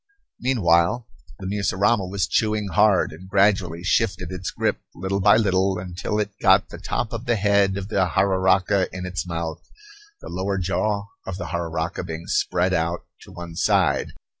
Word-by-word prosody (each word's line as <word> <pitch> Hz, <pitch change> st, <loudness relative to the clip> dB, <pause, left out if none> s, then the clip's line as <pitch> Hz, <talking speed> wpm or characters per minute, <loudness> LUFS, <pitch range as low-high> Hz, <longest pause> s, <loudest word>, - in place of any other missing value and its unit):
Meanwhile 105 Hz, -3 st, +2 dB, 0.3 s
the 95 Hz, -, -9 dB
mussurama 100 Hz, +1 st, +1 dB
was 100 Hz, 0 st, 0 dB
chewing 105 Hz, -2 st, 0 dB
hard, 105 Hz, -4 st, +3 dB
and 90 Hz, +5 st, -12 dB
gradually 95 Hz, -4 st, +2 dB
shifted 90 Hz, -1 st, 0 dB
its 90 Hz, 0 st, -4 dB
grip, -, -, -1 dB, 0.2 s
little 95 Hz, +2 st, -2 dB
by 100 Hz, +1 st, +6 dB
little, 95 Hz, -3 st, +2 dB
until 90 Hz, +3 st, -4 dB
it 105 Hz, -1 st, -1 dB
got 95 Hz, 0 st, +4 dB
the -, -, -9 dB
top 120 Hz, -, -3 dB
of 115 Hz, +1 st, -5 dB
the 120 Hz, -, +3 dB
head 100 Hz, -2 st, +2 dB
of 100 Hz, 0 st, -5 dB
the 95 Hz, -4 st, +2 dB
jararaca 95 Hz, 0 st, +2 dB
in 90 Hz, -1 st, -6 dB
its 90 Hz, 0 st, -4 dB
mouth, 85 Hz, -1 st, -4 dB, 0.6 s
the -, -, -11 dB
lower 95 Hz, +2 st, -2 dB
jaw 100 Hz, +3 st, 0 dB, 0.2 s
of 95 Hz, -2 st, -4 dB
the -, -, -5 dB
jararaca 85 Hz, -1 st, -3 dB
being 80 Hz, +1 st, -6 dB
spread 90 Hz, +1 st, +1 dB
out 85 Hz, 0 st, -1 dB, 0.2 s
to -, -, -14 dB
one 85 Hz, -1 st, -8 dB
side. -, -, +1 dB
95 Hz, 165 wpm, -23 LUFS, 90-100 Hz, 0.6 s, by